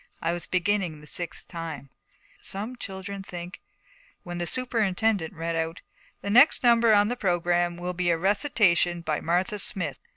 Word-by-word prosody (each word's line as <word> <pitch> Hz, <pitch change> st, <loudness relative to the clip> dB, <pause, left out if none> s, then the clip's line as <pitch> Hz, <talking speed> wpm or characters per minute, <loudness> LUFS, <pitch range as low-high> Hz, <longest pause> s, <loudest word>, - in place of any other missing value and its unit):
I 170 Hz, -, -1 dB
was 175 Hz, -, -5 dB
beginning 180 Hz, -3 st, 0 dB
the 150 Hz, -, -14 dB
sixth 175 Hz, +3 st, -3 dB
time, 160 Hz, -6 st, -7 dB, 0.5 s
'Some 210 Hz, +6 st, -4 dB
children 195 Hz, -3 st, -7 dB
think, 180 Hz, -1 st, -8 dB, 0.3 s
' -, -, -31 dB
when 175 Hz, 0 st, -6 dB
the 175 Hz, -, -2 dB
superintendent 220 Hz, -6 st, 0 dB
read 165 Hz, +1 st, -3 dB
out, 165 Hz, +1 st, -3 dB, 0.4 s
'The 200 Hz, -, -3 dB
next 250 Hz, +7 st, +6 dB
number 235 Hz, -1 st, +5 dB
on 205 Hz, -1 st, +5 dB
the 245 Hz, -, -1 dB
programme 175 Hz, -4 st, 0 dB
will 180 Hz, +1 st, -4 dB
be 180 Hz, 0 st, 0 dB
a 170 Hz, -, +3 dB
recitation 185 Hz, -, +2 dB
by 155 Hz, -2 st, -2 dB
Martha 180 Hz, +5 st, 0 dB
Smith.' 195 Hz, -1 st, 0 dB
180 Hz, 165 wpm, -26 LUFS, 170-210 Hz, 0.5 s, next